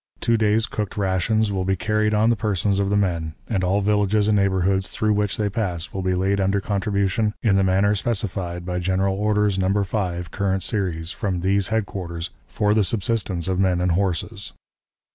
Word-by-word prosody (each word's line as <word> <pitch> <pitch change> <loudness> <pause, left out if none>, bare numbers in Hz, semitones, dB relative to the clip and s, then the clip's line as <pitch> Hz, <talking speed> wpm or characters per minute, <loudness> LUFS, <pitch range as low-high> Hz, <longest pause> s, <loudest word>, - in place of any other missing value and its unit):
Two 115 - +2
days' 110 0 +2
cooked 105 -7 -4
rations 100 +2 +1
will 95 -2 -1
be 95 +1 +1
carried 105 +3 0
on 110 +2 +3
the - - +2
persons 100 -2 0
of 100 -1 +1
the 100 - +2
men, 85 -5 -1
and 95 -4 -1
all 95 +3 +2
villages 105 0 +2
and 110 - +3
neighborhoods 95 -1 +1
through 110 -1 0
which 105 -1 0
they 105 - 0
pass 95 -5 -3
will 95 - -3
be 95 0 0
laid 95 +2 +1
under 95 +1 +1
contribution 100 +1 0
in 105 -4 +3
the 95 - +3
manner 95 +2 +3
specified 95 -5 -2
by 90 0 -2
General 95 +2 0
Orders, 105 -1 +1
No. 100 +2 +1
5, 90 -3 -3
current 95 -1 -1
series, 90 -6 -2
from 95 -5 -2
these 95 +1 +2
headquarters, 95 -6 -3 0.2
for 105 0 +1
the 110 -1 +3
subsistence 95 -3 -1
of 95 -1 0
men 95 -2 +2
and 90 0 +1
horses. 100 +3 -2
100 Hz, 190 wpm, -23 LUFS, 95-105 Hz, 0.2 s, on